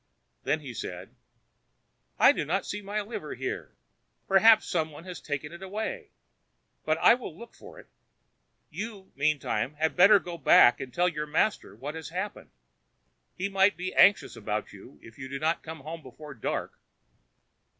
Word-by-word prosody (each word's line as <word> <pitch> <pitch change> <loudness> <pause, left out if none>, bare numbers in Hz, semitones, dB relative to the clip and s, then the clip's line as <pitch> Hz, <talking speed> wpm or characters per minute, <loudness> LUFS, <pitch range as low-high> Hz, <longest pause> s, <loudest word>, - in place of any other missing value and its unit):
Then 155 - 0
he 135 -4 -8
said: 90 -4 -7 1.0
"I - - +7
do - - -2
not - - -1
see 205 - -5
my 205 +1 -3
liver 210 +3 -6
here. - - -5 0.5
Perhaps 220 +3 +6
somebody 160 +2 -3
has 180 -2 -7
taken 145 +1 -4
it 170 - -11
away. 220 - -5 0.7
But 155 0 +1
I - - +6
will 235 -10 -6
look 235 +1 -12
for - - -14
it. - - -13 0.9
You, 210 -3 -7
meantime, 145 0 0
had 160 +1 0
better 200 +4 +7
go 175 -3 -7
back 125 -3 +6
and 130 - -6
tell 175 +8 +2
your 150 -3 -3
master 160 +8 0
what 145 +2 -6
has 160 -1 -7
happened. 185 +4 -5 0.9
He 185 - -2
might 195 0 +3
be 185 +1 -4
anxious 200 0 +4
about - - -4
you - - -14
if 115 +2 -15
you 130 - -6
did 140 +1 -6
not 160 +2 +1
get 160 0 -8
home 160 +3 -8
before 150 +2 -11
dark." 115 - -4
165 Hz, 165 wpm, -28 LUFS, 150-200 Hz, 1.0 s, I